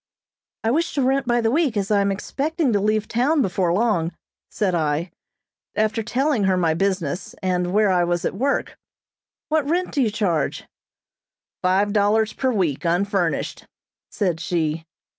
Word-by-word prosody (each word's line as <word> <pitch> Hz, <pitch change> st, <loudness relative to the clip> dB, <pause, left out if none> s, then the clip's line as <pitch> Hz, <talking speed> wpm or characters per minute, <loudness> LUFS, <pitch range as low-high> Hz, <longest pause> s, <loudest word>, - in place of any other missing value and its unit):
"I 225 Hz, -, +2 dB
wish 325 Hz, +5 st, 0 dB
to 280 Hz, -, +1 dB
rent 265 Hz, 0 st, +1 dB
by 240 Hz, -1 st, +2 dB
the 225 Hz, 0 st, +1 dB
week, 285 Hz, -6 st, +1 dB
as 200 Hz, 0 st, -1 dB
I 205 Hz, -1 st, +4 dB
am 200 Hz, 0 st, +1 dB
expecting 285 Hz, -, -1 dB
to 205 Hz, -, +3 dB
leave 215 Hz, +1 st, 0 dB
town 270 Hz, +5 st, +2 dB
before 180 Hz, -3 st, 0 dB
long," 180 Hz, -4 st, +1 dB, 0.4 s
said 195 Hz, -4 st, -1 dB
I, 160 Hz, +1 st, 0 dB, 0.6 s
after 220 Hz, +1 st, +1 dB
telling 245 Hz, 0 st, 0 dB
her 190 Hz, -1 st, +2 dB
my 165 Hz, -3 st, +2 dB
business, 185 Hz, -2 st, -2 dB
and 180 Hz, -1 st, 0 dB
where 210 Hz, 0 st, +3 dB
I 180 Hz, -1 st, +3 dB
was 175 Hz, 0 st, -1 dB
at -, -, -1 dB
work. 270 Hz, +8 st, -1 dB, 0.7 s
"What 305 Hz, -2 st, +1 dB
rent 360 Hz, +3 st, 0 dB
do 285 Hz, -, 0 dB
you 235 Hz, -, +2 dB
charge?" 185 Hz, -7 st, -1 dB, 1.0 s
"Five 195 Hz, +3 st, +2 dB
dollars 215 Hz, +1 st, +2 dB
per 260 Hz, -1 st, 0 dB
week, 180 Hz, -, 0 dB
unfurnished," 180 Hz, 0 st, -1 dB, 0.4 s
said 180 Hz, -6 st, -1 dB
she. 160 Hz, -1 st, -1 dB
205 Hz, 160 wpm, -22 LUFS, 180-240 Hz, 1.0 s, I